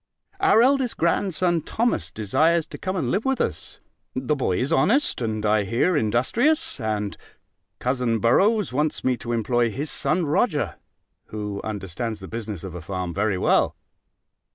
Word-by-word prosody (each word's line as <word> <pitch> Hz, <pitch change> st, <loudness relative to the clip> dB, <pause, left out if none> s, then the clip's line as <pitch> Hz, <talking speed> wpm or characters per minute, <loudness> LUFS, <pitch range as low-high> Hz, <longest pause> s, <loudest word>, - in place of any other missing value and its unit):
Our 385 Hz, -, +5 dB
eldest 265 Hz, -2 st, +2 dB
grandson 175 Hz, 0 st, +1 dB
Thomas 235 Hz, +9 st, -1 dB
desires 160 Hz, -, +1 dB
to -, -, -10 dB
come 185 Hz, 0 st, -3 dB
and 140 Hz, -10 st, -1 dB
live 200 Hz, +4 st, 0 dB
with 270 Hz, -1 st, 0 dB
us: -, -, -3 dB, 0.4 s
the 130 Hz, +3 st, 0 dB
boy 110 Hz, -10 st, 0 dB
is 135 Hz, +6 st, 0 dB
honest, 235 Hz, -, +2 dB
and, 110 Hz, -2 st, -2 dB
I 105 Hz, 0 st, +3 dB
hear, 115 Hz, -, +1 dB
industrious. 230 Hz, -, +1 dB
And 105 Hz, -3 st, -2 dB, 0.6 s
cousin 125 Hz, -2 st, 0 dB
Borroughs 195 Hz, -, +3 dB
wants 150 Hz, +3 st, 0 dB
me 130 Hz, -1 st, +2 dB
to 120 Hz, -, -6 dB
employ 120 Hz, +1 st, +1 dB
his 140 Hz, +6 st, -4 dB
son 155 Hz, +6 st, 0 dB
Roger, 150 Hz, 0 st, 0 dB, 0.5 s
who 105 Hz, -2 st, -5 dB
understands 105 Hz, +2 st, -4 dB
the 95 Hz, -, -9 dB
business 110 Hz, -5 st, -5 dB
of 95 Hz, -3 st, -7 dB
a 85 Hz, -, -7 dB
farm 90 Hz, 0 st, -4 dB
very 100 Hz, 0 st, 0 dB
well. -, -, +2 dB
125 Hz, 155 wpm, -24 LUFS, 105-175 Hz, 0.6 s, Our